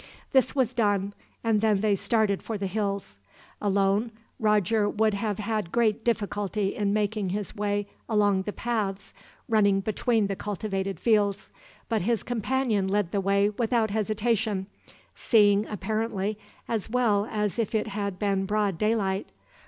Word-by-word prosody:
This 265 0 +3
was 255 -3 +1
done, 205 -4 +1 0.3
and 225 -2 +2
then 215 -3 +2
they 210 -1 +3
started 200 0 +1
for 225 - -4
the 200 - -3
hills. 200 - -3 0.4
Alone, 200 +2 +1 0.3
Roger 210 -1 +2
would 215 0 +1
have 205 0 -2
had 215 -4 -2
great 225 -2 +1
difficulty 205 -3 -1
in 205 -1 0
making 210 -1 0
his 200 +1 -4
way 205 0 -1 0.2
along 205 -3 +3
the 210 - -4
paths 205 -4 -3 0.3
running 200 -3 +3
between 215 +2 +1
the 195 0 -2
cultivated 195 -1 -3
fields; 205 -3 +1 0.4
but 225 -3 0
his 225 +2 0
companion 240 -3 0
led 195 -2 0
the 200 - 0
way 200 +1 +3
without 225 0 0
hesitation, 215 -1 0 0.5
seeing, 205 -2 +3
apparently, 215 -1 -2 0.3
as 225 -2 -2
well 220 -4 +2
as 210 +1 -1
if 225 0 -1
it 215 - +1
had 200 -2 -3
been 195 -1 0
broad 205 -4 0
daylight. 205 -3 0
210 Hz, 145 wpm, -27 LUFS, 200-220 Hz, 0.5 s, This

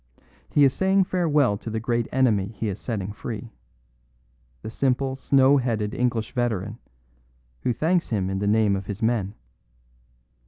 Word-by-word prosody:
He 145 - +4
is 135 -2 +5
saying 190 +3 +3
farewell 150 - +1
to - - -7
the 110 0 -2
great 115 0 -1
enemy 115 -7 +2
he 110 - -2
is 100 - -5
setting 105 -5 -3
free 110 +1 -7 1.1
the 110 - -6
simple, 130 +2 0
snow 135 +1 +4
headed 110 -5 -1
English 120 -3 -1
veteran, 115 -3 -2 0.8
who - - 0
thanks 170 +8 0
him 100 -5 0
in 95 0 -2
the 100 - -1
name 105 -1 +3
of 95 0 -5
his 100 +1 -5
men. 110 -3 0
115 Hz, 155 wpm, -24 LUFS, 105-130 Hz, 1.1 s, is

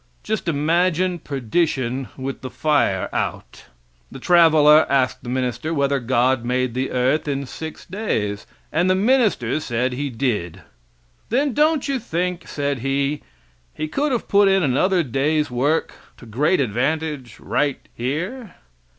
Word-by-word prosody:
Just - - -3
imagine 170 +3 +1
perdition 135 -2 -1
with 135 0 -5
the 130 - -6
fire 145 -13 +1
out. - - -4 0.5
The - - -8
traveler 155 -3 +5
asked 130 -2 +1
the 120 - -8
minister 130 +5 -2
whether 140 -1 +1
God 125 0 +1
made 125 0 -1
the 130 +2 -2
earth 130 +5 +1
in 140 -1 -2
six 160 +4 -8
days, 110 - -3 0.2
and 170 +4 +1
the 185 - +4
minister 205 - +2
said 125 -3 -1
he 140 +3 -3
did. 105 - -2 0.7
Then 270 +3 +1
don't 305 +1 +2
you 275 -2 -1
think, 180 -4 -3
said 140 -2 -2
he, 140 +3 -1 0.5
He 155 - -3
could 285 - -1
have 245 - -2
put 200 0 +4
in 195 -1 +3
another 175 +7 +2
day's 145 +3 0
work 140 +6 0 0.2
to - - -14
great 140 - +1
advantage 135 +1 -2
right 145 -2 0 0.2
here? 180 - -4
145 Hz, 140 wpm, -21 LUFS, 130-175 Hz, 0.7 s, traveler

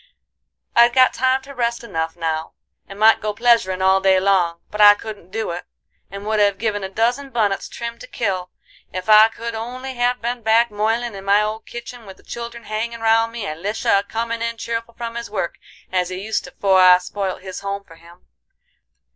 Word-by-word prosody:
I'd 235 0 +6
got 255 0 +5
time 260 +1 +1
to 280 +1 -11
rest 235 -2 -2
enough 160 -7 -3
now, 160 -1 -3 0.3
and 195 - -10
might 220 +1 +5
go 210 -1 -3
pleasuring 215 -6 +2
all 190 0 +4
day 190 -1 +4
long; 185 -3 +2
but 210 - -2
I 205 0 +9
couldn't 205 -4 -9
do 220 -1 -3
it, 175 +1 -5 0.5
and 200 +1 -8
would 215 0 0
have 200 -1 +3
given 205 -1 -2
a 190 - -4
dozin 240 +7 0
bunnets 210 -6 -1
trimmed 235 0 -6
to - - -9
kill 185 -5 -2 0.4
ef 185 +1 -5
I 215 +1 +9
could 230 +1 -6
only 250 +4 -6
have 245 0 0
been 240 +1 -3
back 225 +1 +3
moilin' 225 +3 -1
in 195 -1 -8
my 200 +2 +3
old 215 +1 -4
kitchen 235 -1 -9
with 190 - -11
the - - -22
children 235 0 -7
hangin' 230 +2 -4
round 225 0 +3
me 230 -2 -5
and 155 +1 -6
Lisha 205 -1 +1
a - - -4
comin' 230 +1 -3
in 230 0 -2
cheerful 230 0 -4
from 235 -1 -5
his 235 -1 -6
work 195 -5 -3 0.3
as 180 -1 0
he 185 - -5
used 210 +3 -2
to - - -11
'fore 190 -2 +4
I 180 0 +8
spoilt 185 +1 -4
his 190 -1 -6
home 200 0 -4
for 165 -4 -17
him. 170 +2 -18
215 Hz, 210 wpm, -20 LUFS, 190-235 Hz, 0.5 s, I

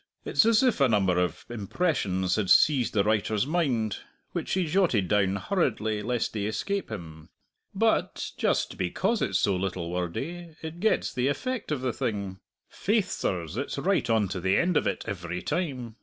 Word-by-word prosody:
It's 225 - +3
as 230 +1 +5
if 245 - +2
a 135 - +5
number 95 -5 +2
of 90 -3 -2
impressions 100 - 0
had 105 -4 -1
seized 135 -6 +5
the 100 - +4
writer's 110 +1 +1
mind, 135 - 0 0.3
which - - -3
he 185 -2 +1
jotted 155 - +2
down 100 0 +2
hurriedly, 110 - 0
lest 120 +2 -1
they 110 - -3
should 100 +1 -1
escape 200 - -2
him. 80 -6 -8 0.5
But, - - +1
just - - 0
because 190 - 0
it's 95 - +1
so 100 +1 +2
little 90 -2 -3
wordy, 155 - -4
it 160 +2 -6
gets 220 +3 +1
the 125 0 0
effect 235 - -2
of 145 -4 -1
the 130 -2 -1
thing 100 -4 -3 0.3
faith, 210 0 0
sirs, 85 +1 -2
it's 140 +2 -3
right 185 -1 +1
on 110 -3 +3
to 95 - -3
the 95 +2 +2
end 175 0 +2
of - - +2
it - - -2
every 90 -2 -4
time! 130 -10 -3
110 Hz, 180 wpm, -27 LUFS, -, 0.5 s, as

